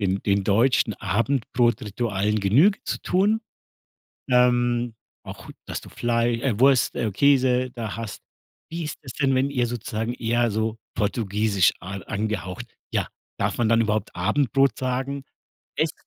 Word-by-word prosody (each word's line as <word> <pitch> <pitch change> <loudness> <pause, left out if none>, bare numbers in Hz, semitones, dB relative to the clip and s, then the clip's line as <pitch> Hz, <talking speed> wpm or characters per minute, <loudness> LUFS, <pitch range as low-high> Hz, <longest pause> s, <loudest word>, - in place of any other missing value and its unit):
den 95 -1 0
den 100 -1 +1
deutschen 110 +2 +3
Abendbrotritualen 110 -3 0
Genüge 140 - +4
zu - - -3
tun? 205 +4 +2 0.9
Ähm, 120 -1 +3 0.3
auch - - -9 0.2
dass - - -4
du - - -12
Flei 120 0 0
äh, 120 -5 -1
Wurst, 135 -1 +4
äh, 120 -3 -1
Käse 130 +2 +3
da 115 -5 -5
hast. 115 -3 -6 0.5
Wie 165 0 -4
ist 150 - -5
es 130 -4 -8
denn, 135 -2 +1
wenn 130 +2 +1
ihr 125 -3 +1
sozusagen 115 -1 -3
eher 120 0 +1
so 110 +1 -1 0.2
Portugiesisch 105 -2 +1
a 95 +2 -6
angehaucht 100 +1 -4 0.3
ja, - - 0 0.3
darf - - -1
man 115 - +2
dann 115 0 +4
überhaupt 105 -1 -1
Abendbrot 135 +6 +2
sagen? 135 +2 -2 0.5
Echt? - - 0
120 Hz, 140 wpm, -24 LUFS, 105-130 Hz, 0.9 s, Genüge